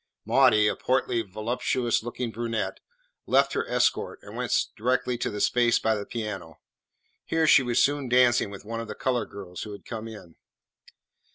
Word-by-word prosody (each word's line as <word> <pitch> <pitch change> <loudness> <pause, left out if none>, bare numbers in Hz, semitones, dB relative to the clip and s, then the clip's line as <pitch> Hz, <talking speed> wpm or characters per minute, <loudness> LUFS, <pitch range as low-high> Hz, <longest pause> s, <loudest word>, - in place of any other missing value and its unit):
Maudie 105 -1 +5
a - - +1
portly, 125 -2 0
voluptuous 115 +4 -1
looking 120 +1 -4
brunette 115 -1 -3 0.5
left - - +3
her 450 +2 -1
escort - - +1
and - - -11
went - - -3 0.2
directly 125 +2 0
to - - -1
the 105 - -5
space 120 +2 +3
by 110 - +1
the 105 -2 -4
piano. 105 -8 -6 0.6
Here 160 0 +1
she 150 - +7
was 120 -2 +2
soon 145 -2 0
dancing 125 -3 +4
with 100 0 -10
one 115 +1 -4
of 115 - -5
the - - -6
coloured 125 -4 -1
girls 95 -3 -8
who 105 - -6
had 100 - -11
come 110 -1 -6
in. 105 -7 -12
115 Hz, 175 wpm, -26 LUFS, 105-125 Hz, 0.6 s, she